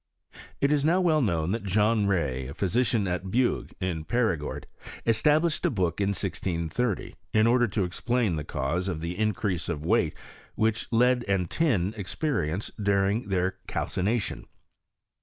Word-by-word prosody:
It 140 - +3
is 145 -2 +2
now 170 +5 +3
well 160 -4 +3
known 85 - 0
that 115 +2 -1
John 105 +2 +2
Key, 65 -9 0
a 70 - -8
physician 110 +1 +1
at 90 +1 -2
Bugue, 120 +5 +1
in 90 -4 -2
Perigord, 90 -7 -1 0.6
published 155 +2 +3
a 175 - +3
book 95 - -1
in 100 - +2
1630, 95 +2 -2 0.2
in 110 0 +4
order 120 +1 +4
to 100 -1 -1
explain 110 +2 0
the 75 - -3
cause 75 +6 -2
ofthe 85 0 -3
increase 105 -4 -1
of 75 0 -3
weight - - +2 0.4
which 110 +1 0
lead 125 +1 +3
and 95 -4 0
tin 110 - +1
experience 100 - -2
during 100 +2 +1
their 95 -1 0
calcina 105 +6 0
tion. - - -6
100 Hz, 150 wpm, -27 LUFS, 90-120 Hz, 0.6 s, in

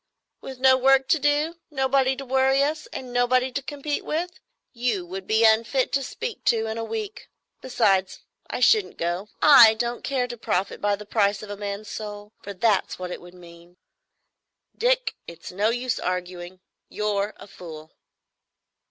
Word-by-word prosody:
"With 265 -1 -8
no 260 0 +5
work 270 +1 +4
to 320 - +3
do, 295 +4 0
nobody 265 -2 +1
to 275 - -8
worry 265 +1 +3
us, 305 +2 -2
and 255 -2 -8
nobody 250 +1 +2
to 280 - -3
compete 290 +1 -4
with? 340 +4 -2 0.4
You 235 -7 -1
would 185 +2 -7
be 220 +1 +3
unfit 230 +4 +3
to 275 - +1
speak 445 - -6
to 225 -1 +2
in 220 +1 -4
a - - -3
week. 425 - -6 0.3
Besides, 195 -7 +1 0.3
I - - -4
shouldn't 430 -3 +3
go. 175 +5 -3
I 240 -7 +9
don't 235 +1 -3
care 260 -3 -1
to 240 -1 -7
profit 195 -2 -2
by 205 0 +1
the 210 +1 -11
price 205 -1 +1
of 210 - -8
a - - -4
man's 205 +1 -6
soul,—for 205 -1 -8
that's 205 +1 +1
what 180 -1 -6
it - - -6
would 175 +1 -14
mean. 170 0 -16 1.0
Dick, - - +1
it's 170 -1 -10
no 205 +4 +1
use 245 0 -2
arguing. 180 0 -5 0.3
You're 210 -1 -2
a - - -12
fool." 160 -5 -11
230 Hz, 170 wpm, -24 LUFS, 200-270 Hz, 1.0 s, I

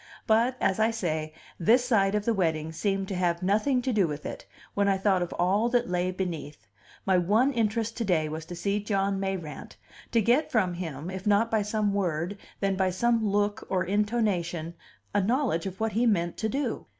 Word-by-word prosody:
But, 235 +3 +3
as 195 +1 +1
I 220 +1 +4
say, 160 -8 -2 0.3
this 235 +8 +4
side 205 -5 +2
of 210 -1 -1
the 230 - +2
wedding 160 -5 0
seemed 195 +3 -1
to 195 - -2
have 175 -1 0
nothing 220 +7 +2
to 255 - 0
do 200 -5 +3
with 150 -1 -6
it, - - -7 0.3
when 200 0 +1
I 195 -1 +3
thought 190 -1 +2
of 175 - -2
all 200 +6 +2
that 245 -4 +1
lay 180 0 +1
beneath; 165 -8 -5 0.4
my 190 -2 +4
one 215 +10 +3
interest 225 -1 -1
to 235 - -1
day 170 -7 +1
was 155 +1 -5
to 175 +1 -7
see 200 +4 -1
John 195 -1 0
Mayrant, 185 -7 -5 0.4
to 235 - +3
get 240 +8 +2
from 190 -6 +2
him, 165 -2 -5
if 190 +2 -6
not 210 +3 +3
by 220 -1 +2
some 210 0 0
word, 180 0 -1 0.2
then 195 -1 +1
by 190 -1 +1
some 230 +5 +1
look 205 +1 0
or 185 -1 +1
intonation, 190 -5 0 0.4
a 205 - +3
knowledge 215 - 0
of 190 0 -7
what 220 0 0
he 235 +3 +2
meant 175 -6 +1
to 220 - -1
do. 265 -1 -2
195 Hz, 205 wpm, -27 LUFS, 175-220 Hz, 0.4 s, I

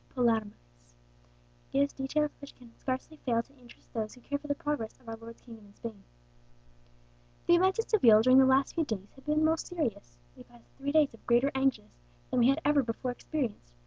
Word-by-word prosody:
Palomares, 225 - 0 1.1
gives 280 +1 +1
details 295 +2 -1
which 280 - -11
can 235 -2 -17
scarcely 260 +4 -4
fail 230 -5 0
to 275 - -25
interest 240 -1 -19
those 220 0 -3
who 250 - -17
care 285 +3 -3
for 295 - -11
the 285 - 0
progress 285 -7 -4
of 245 - -23
our 225 - -5
Lord's 230 +1 -12
kingdom 225 -4 -13
in 200 - -21
Spain. 220 -4 -8 1.4
"The 345 - +5
events 375 +3 +3
at 450 - -2
Seville 230 - +6
during 255 +2 +7
the 265 - +7
last 265 +1 +3
few 330 - +1
days 205 -8 -5
have 270 +2 -19
been 305 +1 +2
most 320 0 +1
serious. 235 - -4 0.2
We - - -14
passed 120 -1 -18
three 280 +1 -2
days 300 -3 +3
of 230 - -18
greater 245 +4 +3
anguish 265 -1 0 0.4
than 255 - +2
we 240 - +5
had 280 +4 +2
ever 295 -1 +4
before 245 +1 -3
experienced. 245 - -4
255 Hz, 205 wpm, -30 LUFS, 230-290 Hz, 1.4 s, during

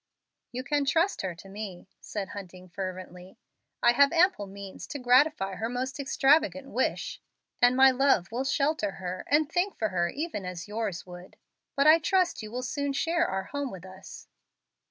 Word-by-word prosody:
"You 255 +1 -4
can 290 +1 0
trust 330 +7 +1
her 185 -3 -4
to 185 - -13
me," 195 -2 -8
said 200 -3 -5
Hunting, 185 -2 -9
fervently. 185 0 -7 0.5
"I 240 - +7
have 280 +3 +5
ample 335 - +3
means 195 0 -9
to - - -5
gratify 250 -4 +3
her 225 +1 -2
most 255 +3 -3
extravagant 280 0 +2
wish, 260 - -2 0.4
and 245 +1 +5
my 265 0 +8
love 255 -8 +2
will 245 +3 -1
shelter 275 -6 0
her 185 -1 -5
and 295 +1 +3
think 355 +5 -1
for 220 - 0
her 175 -2 0
even 295 - -4
as 180 -2 -6
yours 210 -4 -3
would. 180 0 -12 0.4
But 280 - +2
I 315 +2 +8
trust 365 +1 +1
you 215 -1 -8
will 250 +2 -4
soon 285 +2 -2
share 335 +5 +1
our 190 0 -2
home 285 +6 -4
with 190 -4 -10
us." 190 +1 -12
245 Hz, 175 wpm, -28 LUFS, 190-285 Hz, 0.5 s, my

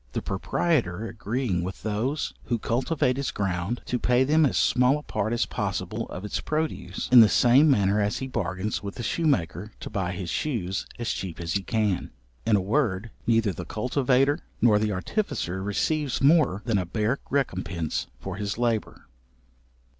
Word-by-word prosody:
The - - -1
proprietor 110 - 0
agreeing 110 -4 -2
with 90 +1 -6
those 115 +8 -1
who 120 - 0
cultivate 125 +3 0
his 140 -1 -1
ground 95 +3 -2
to 125 - -1
pay 125 +2 +3
them 155 +2 +4
as - - -1
small 125 +3 +3
a 150 - -8
part 110 -5 -2
as 120 - +1
possible - - -3
of 95 - -6
its 105 - -2
produce, 155 +1 -3
in 125 - +10
the 110 -2 +8
same 130 +6 +5
manner 105 -5 +3
as 100 0 0
he 130 - -4
bargains 100 -5 -2
with 100 0 -6
the 120 - -5
shoemaker 105 - 0
to - - -7
buy 90 -3 -2
his 90 -1 -4
shoes 105 -10 -2
as 120 - -2
cheap 90 -4 -5
as 85 -1 -3
he 100 - +1
can. 105 -2 0 0.4
In 110 - +5
a 100 - +2
word, 110 -1 0 0.2
neither 115 -4 +3
the 90 - -6
cultivator, 130 - +1 0.2
nor 105 -3 +5
the 105 0 0
artificer 95 - -2
receives 135 +8 0
more 135 - +4
than 110 -5 +2
a 90 - -2
bare 110 +7 0
recompense 95 - -1
for 95 +5 -6
his 100 0 -3
labour. 115 -3 -1
110 Hz, 175 wpm, -26 LUFS, 95-130 Hz, 0.4 s, in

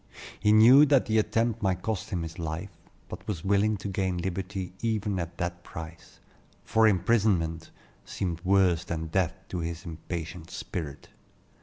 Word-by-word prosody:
He 105 +1 +3
knew 125 +7 +8
that 140 -2 +4
the 110 0 +2
attempt 115 +1 0
might 95 -3 0
cost 110 -2 -2
him 90 -6 -2
his 80 +1 -7
life, 80 +4 -4 0.4
but - - -9
was 95 -6 -4
willing 100 +2 +2
to 100 - -6
gain 95 -2 -1
liberty 95 +1 -4
even 105 -4 -1
at 85 0 -5
that 85 0 -3
price; 80 0 -10 0.4
for 110 0 +4
imprisonment 95 -6 +1 0.3
seemed 85 -3 -4
worse 95 -3 +3
than 80 -2 -4
death 95 +1 +1
to 90 - -3
his 85 0 -5
impatient 85 0 -6
spirit. 75 -5 -6
95 Hz, 155 wpm, -28 LUFS, 85-105 Hz, 0.4 s, knew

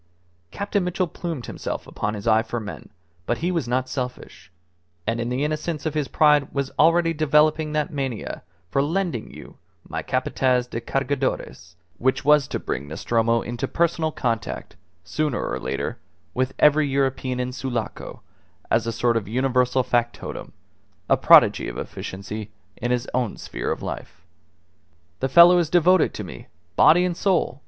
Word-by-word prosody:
Captain 200 - -1
Mitchell 180 +1 0
plumed 165 -6 -5
himself - - -5
upon 105 +1 -3
his 105 +1 -7
eye 110 0 +5
for 115 +1 -4
men 105 -2 -8 0.4
but 120 - 0
he 175 +3 -1
was 165 -8 -1
not 130 +1 0
selfish 125 -7 -6 0.5
and 115 +1 -1
in 120 - -2
the 125 +3 -1
innocence 155 +1 -2
of 155 - -1
his 150 -3 -1
pride 150 -2 +3
was 140 -1 -2
already 165 +1 +4
developing 155 0 +3
that 150 -1 -1
mania 135 -5 -4 0.3
for 135 - +2
"lending 160 - -2
you - - -13 0.3
my - - -4
Capataz 125 -2 +1
de 115 -1 -5
Cargadores" 135 - -2 0.2
which 130 +1 +1
was 150 -2 +5
to - - -3
bring 70 - -4
Nostromo 115 +9 0
into 120 0 -3
personal 165 -2 0
contact, 115 -6 -3 0.3
sooner 145 - -2
or - - -3
later, 65 +1 -3 0.3
with 130 +1 -1
every 150 0 +5
European 135 -2 -1
in 125 0 -2
Sulaco, 125 -3 -5 0.5
as 115 0 +2
a - - 0
sort 120 +1 +1
of 110 -4 -1
universal 125 +2 +1
factotum 120 -1 -2 0.6
a - - +6
prodigy - - +6
of - - -6
efficiency 105 +3 -6 0.3
in 120 - -3
his 125 +1 0
own 125 -4 -1
sphere - - -4
of - - -4
life. 85 - -7 0.9
"The 135 - -1
fellow 175 +4 +8
is 165 -3 0
devoted 180 +2 +4
to - - -5
me, - - -10 0.3
body 175 +3 +6
and 180 -1 -1
soul!" 175 -8 0
130 Hz, 160 wpm, -23 LUFS, 120-155 Hz, 0.9 s, fellow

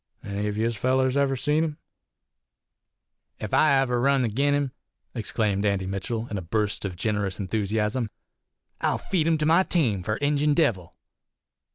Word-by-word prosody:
Any 100 +1 -3
of 105 0 -3
yez 115 +1 0
fellers 130 +2 +1
ever 140 -1 +2
seen 150 +4 +1
him?" 155 -2 -3 1.6
"Ef 105 - -6
ever 135 -5 +3
I - - 0
runs 135 -1 +3
agin 140 +6 +1
him," 140 -2 -1 0.4
exclaimed 105 -3 -1
Andy 100 -2 +1
Mitchell, 105 +5 -3
in 100 - -2
a - - -6
burst 105 +4 -1
of 95 -3 -4
generous 105 0 -2
enthusiasm, 105 +3 -1 0.7
"I'll - - +1
feed 165 -5 -1
him 165 -1 +3
to 150 - -1
my 165 +4 +5
team 130 - +1
fur 105 +4 -2
Injun 145 +2 +1
Devil." 110 - 0
115 Hz, 160 wpm, -25 LUFS, 105-140 Hz, 1.6 s, my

